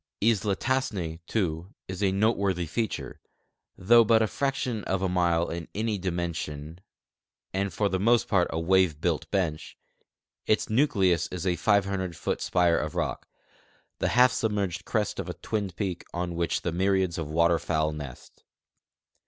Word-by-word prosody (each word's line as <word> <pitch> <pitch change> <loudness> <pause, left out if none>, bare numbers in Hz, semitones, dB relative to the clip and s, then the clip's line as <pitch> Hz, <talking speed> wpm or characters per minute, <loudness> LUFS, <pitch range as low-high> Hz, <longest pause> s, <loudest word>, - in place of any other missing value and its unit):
Isla 105 -2 +2
Tassne, 100 -11 -2
too, 90 -2 -2
is 95 +1 -6
a 100 -2 +3
noteworthy 100 -3 +1
feature; 110 +7 -3 0.6
though 115 +5 +6
but 110 0 +4
a - - +3
fraction 125 -3 -2
of 95 0 -1
a - - +2
mile 85 -2 +1
in 85 -1 -5
any 110 -1 -1
dimension 85 -3 -4 0.7
and 95 +1 -1
for 100 +4 0
the 95 -1 -1
most 115 +4 +3
part 90 -4 +3
a 80 - -2
wave 90 -3 +2
built 85 -1 -1
bench, 85 -6 -2 0.7
its 110 - +1
nucleus 100 - +2
is 90 0 -5
a 90 -2 +2
500 100 -3 +1
foot 85 - -3
spire 90 -2 +2
of - - -4
rock, - - -2 0.7
the - - +1
half 125 +1 +7
submerged 100 -6 -1
crest 105 -2 -1
of - - -4
a - - -5
twinned 100 -5 -3
peak, 90 -2 -3
on 85 0 -2
which 85 0 -1
myriads 95 0 +1
of 80 -2 -4
water 85 +1 +3
fowl 80 0 0
nest. 70 -5 -9
95 Hz, 155 wpm, -27 LUFS, 85-105 Hz, 0.7 s, half